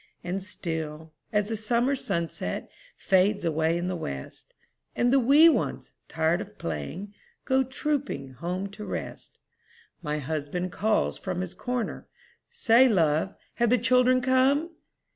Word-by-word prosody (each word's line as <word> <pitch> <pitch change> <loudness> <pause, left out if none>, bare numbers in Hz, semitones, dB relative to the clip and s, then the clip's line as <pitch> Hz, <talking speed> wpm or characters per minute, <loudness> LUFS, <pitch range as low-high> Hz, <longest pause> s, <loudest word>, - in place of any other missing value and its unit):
And 180 +2 -3
still, 160 -5 -5 0.2
as 210 0 +1
the 225 - -1
summer 235 +5 +1
sunset 170 -9 -3 0.3
Fades 195 +1 +2
away 160 +1 +1
in 175 - -2
the 185 0 -2
west, 70 - -7 0.4
And 245 +1 +2
the 275 - +6
wee 280 +6 +7
ones, 330 - 0
tired 160 +3 +1
of 210 0 -10
playing, 85 - -5 0.3
Go 265 0 +3
trooping 270 - -3
home 180 +8 -3
to 210 +1 -9
rest, - - -6 0.6
My 150 -2 -2
husband 155 +5 -3
calls 215 +3 0
from 185 -2 -3
his 185 -2 -4
corner, 250 -2 -4 0.4
"Say, 260 - +5
love, 165 -2 +2 0.2
have 235 -1 +3
the 250 - +4
children 250 +2 +4
come?" 265 +5 +2
200 Hz, 140 wpm, -27 LUFS, 165-250 Hz, 0.6 s, wee